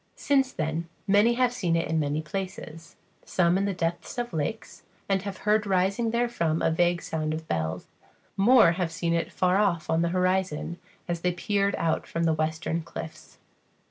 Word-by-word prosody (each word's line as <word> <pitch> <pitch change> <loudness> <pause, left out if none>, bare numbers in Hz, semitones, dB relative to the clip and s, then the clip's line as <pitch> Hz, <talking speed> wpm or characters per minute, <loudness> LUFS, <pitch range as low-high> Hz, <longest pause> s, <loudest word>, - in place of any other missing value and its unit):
Since 270 -2 +2
then 160 +1 -3 0.2
many 210 +4 +4
have 250 0 +2
seen 175 -8 0
it 165 - 0
in 160 +1 0
many 150 +1 -1
places; 165 -1 -6 0.3
some 175 -1 +2
in 195 +1 +1
the 200 - -1
depths 170 +5 -3
of 240 -5 -3
lakes, 160 +8 -4 0.3
and 195 -1 +1
have 195 -1 -6
heard 210 0 +3
rising 195 +4 +1
therefrom 230 -10 0
a - - +2
vague 175 +1 +1
sound 155 -1 -2
of 160 0 -7
bells; 80 -1 -2 0.5
more 220 -2 +6
have 170 -1 -2
seen 165 +1 -1
it 170 0 -1
far 185 +1 +2
off 175 -7 +1
on 160 +1 +2
the 170 - +1
horizon, 185 -2 0 0.3
as 170 -1 -2
they 180 +1 +1
peered 200 +2 0
out 160 -1 -1
from 170 - -2
the 165 -1 +3
western 160 +2 -1
cliffs. 160 0 -9
175 Hz, 180 wpm, -27 LUFS, 160-200 Hz, 0.5 s, more